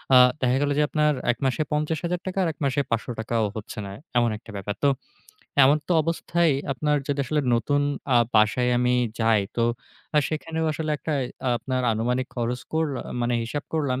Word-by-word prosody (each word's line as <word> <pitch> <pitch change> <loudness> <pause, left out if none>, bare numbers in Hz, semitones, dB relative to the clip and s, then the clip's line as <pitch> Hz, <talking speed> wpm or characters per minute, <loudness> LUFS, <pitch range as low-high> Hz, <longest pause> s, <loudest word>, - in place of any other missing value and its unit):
আ - - +10 0.2
দেখা 125 +1 +2
গেল 145 - +1
যে, - - +4
আপনার 150 -1 +2 0.2
এক 120 - -5
মাসে 130 +4 +1
৫০,০০০ 160 +4 -1
টাকা 185 - -4
আর - - +1
এক - - -42
মাসে 140 +1 +1
৫০০ 115 0 0
টাকাও 110 0 0
হচ্ছে 110 0 -7
না, 100 - -7 0.3
এমন 120 -1 +4
একটা 115 - -13
ব্যাপার। 100 +1 -4
তো 140 - +6 0.8
এমতা 150 +5 +3
অবস্থায় 165 0 +1 0.2
আপনার 150 +2 +1
যেটা 140 -1 0
আসলে 150 +3 0
নতুন 145 +5 +1 0.3
আ - - +7 0.2
বাসায় 110 +4 +3
আমি 125 0 +2 0.3
যাই 110 -2 +4 0.2
তো 115 - +3 0.6
সেখানেও 160 +1 -3
আসলে 155 0 -3
একটা 155 - -4 0.3
আ - - +3
আপনার 130 +2 -2
আনুমানিক 125 +4 0
খরচ 125 +1 -2
করলা 160 -4 0 0.2
মানে 120 0 +1
হিসাব 145 +6 -4
করলাম। 135 -5 0
135 Hz, 180 wpm, -25 LUFS, 120-150 Hz, 0.8 s, আ